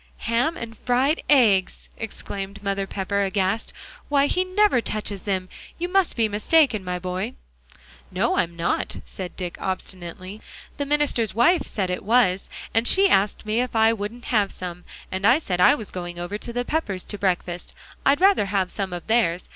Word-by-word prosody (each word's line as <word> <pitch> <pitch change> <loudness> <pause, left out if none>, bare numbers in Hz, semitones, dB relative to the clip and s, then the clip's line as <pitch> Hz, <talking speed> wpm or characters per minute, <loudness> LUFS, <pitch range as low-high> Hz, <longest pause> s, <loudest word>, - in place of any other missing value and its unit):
"Ham 240 +8 +1
and 225 -1 -7
fried 255 +7 +1
eggs!" 220 -10 +3
exclaimed 200 -2 -6
Mother 195 -1 -1
Pepper, 200 +1 -1
aghast. 195 +2 0 0.4
"Why, 285 -1 +4
he 365 +5 +1
never 370 - +3
touches 210 -3 -3
them. 185 -1 -1 0.3
You 350 - -2
must 385 -1 +2
be 225 -2 +2
mistaken, 215 +2 +2
my 180 -1 -3
boy." 185 +6 -4 0.7
"No, - - 0
I'm 170 0 0
not," 170 0 -1
said 185 -2 -7
Dick, 180 -2 -5
obstinately. 185 +1 -5 0.4
"The 285 -1 -2
minister's 285 -8 +1
wife 300 +9 +3
said 190 -3 -2
it 180 - -3
was, 205 -4 +2 0.2
and 225 +1 +3
she 390 +1 +5
asked 200 - +2
me 215 +3 +1
if 250 -2 -4
I 225 0 +5
wouldn't 225 +3 -6
have 210 -5 +1
some, 180 -1 -7 0.3
and 190 +1 -3
I 240 +5 +6
said 180 - -2
I 280 - +7
was 220 -7 -8
going 175 -1 -6
over 175 +3 -4
to 225 +3 -6
the 245 +1 -2
Peppers 210 - -2
to 205 - -7
breakfast; 180 -2 -2 0.3
I'd 285 +4 +3
rather 385 - +5
have 190 -2 0
some 195 -3 -3
of 175 - -6
theirs. 220 -7 +1
210 Hz, 180 wpm, -24 LUFS, 185-245 Hz, 0.7 s, I